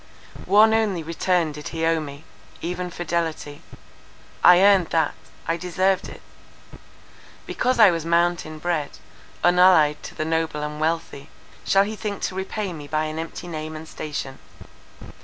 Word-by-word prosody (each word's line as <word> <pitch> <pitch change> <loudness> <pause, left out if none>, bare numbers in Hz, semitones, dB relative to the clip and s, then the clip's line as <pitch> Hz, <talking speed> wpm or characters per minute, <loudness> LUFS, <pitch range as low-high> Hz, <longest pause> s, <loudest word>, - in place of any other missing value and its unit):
One 220 +2 +6
only 210 -7 0
return 165 0 0
did 150 0 -8
he 165 -1 -3
owe 165 0 +2
me, 145 -1 -8 0.4
even 180 +1 -4
fidelity. 165 -4 -3 0.8
I 180 0 +8
earned 195 -4 +5
that; 160 -2 +1 0.3
I 165 - 0
deserved 185 +2 0
it. - - -13 1.2
Because 255 +1 -1
I 215 -5 +7
was 165 -2 -3
mountain 170 -1 0
bred, 160 -2 -3 0.5
unallied 175 -4 +5
to - - -10
the 155 - -3
noble 160 -2 -1
and 150 0 -5
wealthy, 160 -3 -3 0.4
shall 195 0 +4
he 215 +2 -5
think 205 -2 -5
to - - -2
repay 190 +1 -4
me 150 -3 -9
by 155 +1 -1
an 155 +1 -5
empty 165 +2 -7
name 155 -1 -6
and 155 +1 -9
station? 140 -4 -6
165 Hz, 150 wpm, -23 LUFS, 155-180 Hz, 1.2 s, I